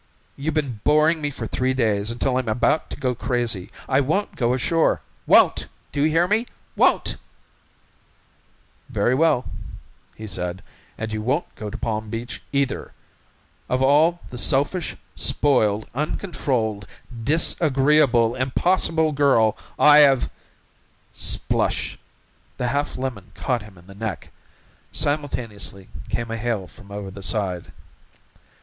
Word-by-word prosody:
You've 150 +3 -3
been 135 -8 -1
boring 155 +2 +3
me 145 - -1
for 125 -5 -6
three 130 +3 -1
days 105 -4 +1
until 125 +2 0
I'm 130 -2 -2
about 120 +8 +1
to - - -7
go 125 -1 0
crazy. 120 -6 -1 0.2
I 135 +1 +3
won't 160 +10 -1
go 120 0 +1
ashore! 160 +5 +1 0.3
Won't! - - +5 0.2
Do 140 - -1
you 155 - +4
hear? 165 +3 +3 0.5
Won't!" - - +2 1.7
"Very 120 0 +1
well," 145 -3 +3 0.7
he 110 - -8
said, 90 -2 -3 0.3
"and 110 0 -4
you 110 - -2
won't 135 +10 -1
go 105 - -6
to - - -6
Palm 110 -1 -3
Beach 115 +2 -5
either. 140 -1 -1 0.8
Of 130 +1 +1
all 155 +6 +4
the 125 - -2
selfish, 145 +8 +1 0.2
spoiled, 110 -7 +2
uncontrolled 125 - -2 0.4
disagreeable, 140 -5 +3
impossible 160 +5 +2
girl 135 -7 +3 0.2
I 150 0 +7
have 135 -3 +5 0.4
" - - -38
Splush! - - 0 0.6
The 125 - -1
half 145 +3 -1
lemon 125 -8 -5
caught 125 -3 -1
him 105 -3 -14
in 85 - -17
the 100 - -13
neck. 105 -2 -5 0.6
Simultaneously 120 -9 -2 0.2
came 120 -1 -3
a 115 - -2
hail 110 -4 -2
from 100 +2 -16
over 100 -1 -6
the 100 +1 -10
side. 90 -1 -1
125 Hz, 130 wpm, -23 LUFS, 110-145 Hz, 1.7 s, I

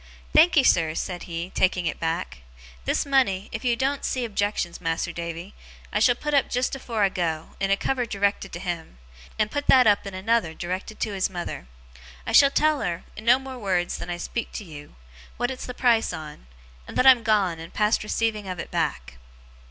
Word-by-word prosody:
'Thankee, 315 -2 +6
sir,' 165 -9 +4
he 155 - -5
said, 180 0 -3 0.3
taking 185 -1 +1
it 160 - -2
back. 165 - -3 0.5
'This - - +1
money, 255 -9 +1
if 225 - -5
you 245 -2 +2
doen't 270 +3 -1
see 255 -2 -1
objections, 205 -5 -2
Mas'r 165 +1 -2
Davy, 170 +3 -6 0.4
I 210 - +2
shall 240 +3 +4
put 300 +4 -4
up 280 - +3
jest 250 +2 0
afore 230 -5 -2
I 195 - +4
go, 165 -4 -3
in 195 - 0
a 195 - +3
cover 250 0 -1
directed 200 -2 -1
to 170 - -5
him; 170 - -5 0.4
and 215 0 0
put 285 0 -3
that 255 -1 +7
up 205 -1 +3
in 195 - -6
another, 190 -4 0
directed 185 +4 -5
to 215 - -1
his 190 -1 0
mother. 175 - -6 0.6
I - - -3
shall 280 - +7
tell 305 +1 +2
her, 175 -1 -2
in 215 - -9
no 245 +2 +6
more 265 -1 -8
wureds 185 -5 -1
than - - -6
I 175 - -3
speak 230 +6 -4
to - - -5
you, 150 - -11 0.4
what 245 +2 -1
it's 260 - -6
the 250 - -6
price 235 -3 +3
on; 150 - -9 0.4
and - - -7
that 255 - +3
I'm 260 -3 +8
gone, 205 -7 +1
and 165 +1 -9
past 210 0 +1
receiving 215 -1 -1
of 185 -1 -4
it - - -7
back. 60 -1 -2
200 Hz, 205 wpm, -25 LUFS, 175-245 Hz, 0.6 s, I'm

